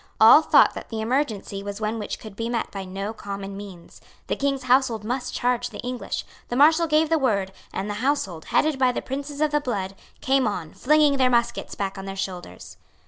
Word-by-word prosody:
All 225 +8 +9
thought - - +5
that - - -8
the 225 - -4
emergency 220 -4 -1
was 200 +1 -6
one 220 +1 -2
which 210 - -4
could 215 -3 -11
be 230 +2 -3
met 235 -2 -2
by 195 -1 -6
no 195 +3 -5
common 200 -2 -6
means. 195 -4 -11 0.2
The - - -1
King's 275 -1 -1
household 250 -4 +2
must 245 +4 -3
charge 245 0 0
the - - -9
English. 250 0 -4 0.2
The 240 - -2
Marshal 315 +5 +5
gave 310 0 +3
the 325 -1 +3
word; 200 -8 0 0.2
and 195 - -3
the 205 - -3
household, 225 - -1
headed 305 -3 +1
by 255 -1 +4
the - - -3
princes 285 +2 -5
of 305 -1 +2
the 295 0 +2
blood, 200 -8 -3 0.3
came 265 -2 +2
on, 180 -7 -4
flinging 295 0 +3
their 260 -1 +4
muskets 240 -1 0
back 195 -1 -3
on 195 - -7
their 195 0 -5
shoulders. 180 - -6
235 Hz, 210 wpm, -24 LUFS, 200-270 Hz, 0.3 s, All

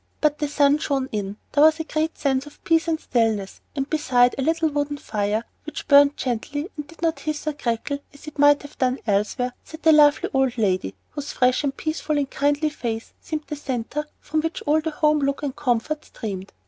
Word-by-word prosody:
But 300 -1 +2
the 295 - 0
sun 285 0 +3
shone 270 -3 -1
in, 205 -1 -3
there 290 - +4
was 315 +1 +6
a - - -1
great 315 0 -2
sense 270 0 0
of 295 - -16
peace 330 0 +2
and 320 -1 0
stillness, 220 -8 0
and 275 -1 -1
beside 250 -6 +3
a - - -3
little 325 +3 +2
wood 290 0 -2
fire, 210 0 -1 0.2
which 310 - -7
burned 285 0 +6
gently 285 - -3
and 295 -2 -6
did 330 +2 -14
not 325 -1 +1
hiss 305 -1 -4
or 305 - 0
crackle 280 +1 -2
as 285 - -15
it 305 -1 -10
might 290 0 +6
have 285 - -12
done 255 0 +2
elsewhere, 215 +4 0
sat 315 +1 -12
a 320 - +8
lovely 295 -1 +5
old 265 -2 +1
lady, 185 - 0 0.2
whose 290 -1 -5
fresh 250 +2 +2
and 275 -1 -2
peaceful 310 -1 -2
and 280 -2 -1
kindly 290 +2 +1
face 230 -5 -4
seemed 310 -1 -4
the 300 - -5
centre 280 +2 -3
from 310 +1 -1
which 325 +1 -3
all 310 +1 +3
the 320 - -2
home 300 0 +2
look 280 +1 -1
and 275 -3 -2
comfort 295 +3 -1
streamed. 195 -3 -6
285 Hz, 210 wpm, -23 LUFS, 250-305 Hz, 0.2 s, a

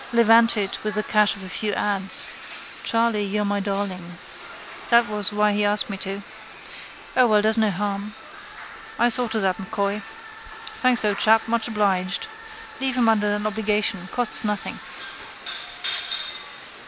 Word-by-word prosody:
Levanted 230 -3 +4
with 210 -1 -2
the 215 - 0
cash 210 -1 +3
of 200 - -10
a - - -7
few 205 +3 -2
ads. 195 -1 0 0.6
Charley, 230 -2 +2
you're 205 +1 -1
my 205 0 0
darling. 195 -3 -4 0.7
That 235 0 +5
was 210 -1 -2
why 210 0 +2
he 210 0 +1
asked 205 0 +1
me 195 - -4
to. 195 +1 -5 0.9
O 255 -1 +5
well, 210 -2 +3
does 220 +1 +4
no 220 -2 +3
harm. 200 +2 -3 0.8
I 240 - +3
saw 245 +1 +2
to 220 0 -1
that, 190 -2 0
M'Coy. 200 +1 -2 0.7
Thanks, 255 - +2
old 205 -1 +1
chap: 220 +1 +4
much 230 0 0
obliged. 195 - 0 0.5
Leave 265 -1 0
him 240 -2 +3
under 210 -2 +3
an 210 0 -4
obligation: 210 -3 0
costs 245 -2 +1
nothing. 210 -2 -2
210 Hz, 145 wpm, -23 LUFS, 200-225 Hz, 0.9 s, That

